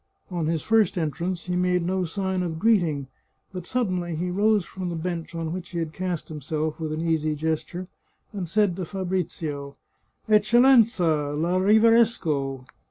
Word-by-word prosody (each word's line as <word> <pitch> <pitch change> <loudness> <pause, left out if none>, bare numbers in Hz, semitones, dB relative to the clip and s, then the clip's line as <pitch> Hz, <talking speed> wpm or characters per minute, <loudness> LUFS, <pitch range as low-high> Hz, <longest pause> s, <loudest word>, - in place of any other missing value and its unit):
On 170 -3 -1
his 160 -1 -1
first 220 -3 +3
entrance 170 +2 -2
he 180 0 -2
made 180 -1 +1
no 185 0 0
sign 190 +2 -2
of 170 -3 -3
greeting, 170 -9 +2 0.5
but 180 -2 -6
suddenly 185 -9 -1
he 180 +3 -2
rose 205 0 +2
from 185 0 -5
the 170 - -3
bench 170 0 -4
on 165 -1 -3
which 180 -1 -6
he 175 - -6
had 165 -2 -3
cast 180 -2 -3
himself 155 +1 -3
with 160 -1 -3
an 155 +1 -3
easy 155 -2 0
gesture, 160 +4 -3 0.5
and 185 -5 -4
said 205 -1 +2
to 185 - -3
Fabrizio: 165 -6 -3 0.3
" - - -43
Eccellensa! 215 - +4
la 175 +3 +1
riverisco!" 195 - +3
175 Hz, 165 wpm, -25 LUFS, 160-190 Hz, 0.5 s, Eccellensa